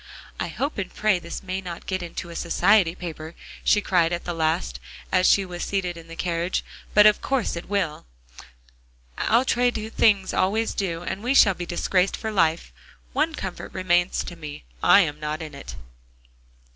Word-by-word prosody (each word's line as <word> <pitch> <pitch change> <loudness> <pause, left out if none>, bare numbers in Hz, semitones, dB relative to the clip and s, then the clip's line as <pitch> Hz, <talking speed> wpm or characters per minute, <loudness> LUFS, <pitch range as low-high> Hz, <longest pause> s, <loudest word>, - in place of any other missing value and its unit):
"I - - -1
hope 280 -4 -3
and 190 - -4
pray 210 -4 +1
this 170 +2 -7
may 190 0 -3
not 175 -2 -8
get 185 -1 -2
into 170 0 -6
a - - -9
society 180 +1 +3
paper," 160 -2 -7 0.3
she 210 - +4
cried 175 -4 +2
at 175 0 -2
the 175 - -3
last, 155 - -1 0.3
as 185 0 +4
she 195 - +4
was 175 -1 -7
seated 185 -3 -2
in 165 -1 -12
the 165 - -9
carriage, 170 +1 -1 0.3
"but 210 0 +8
of 210 -1 +5
course 265 -8 -1
it 170 - -7
will; 185 - -2 1.1
outre 245 +1 +3
things 215 -3 +1
always 220 +4 +1
do. 175 -4 -2
And 190 - -4
we 250 +4 0
shall 200 -7 +7
be 175 -1 -6
disgraced 180 +2 +1
for 220 - -4
life. 165 -5 +1 0.4
One 315 0 +1
comfort 190 -7 -6
remains 175 -1 +1
to 175 - -8
me, 150 -3 -9 0.2
I 200 - +7
am 150 -4 -2
not 150 0 -3
in 155 -3 -7
it." 140 - -9
180 Hz, 180 wpm, -24 LUFS, 170-205 Hz, 1.1 s, but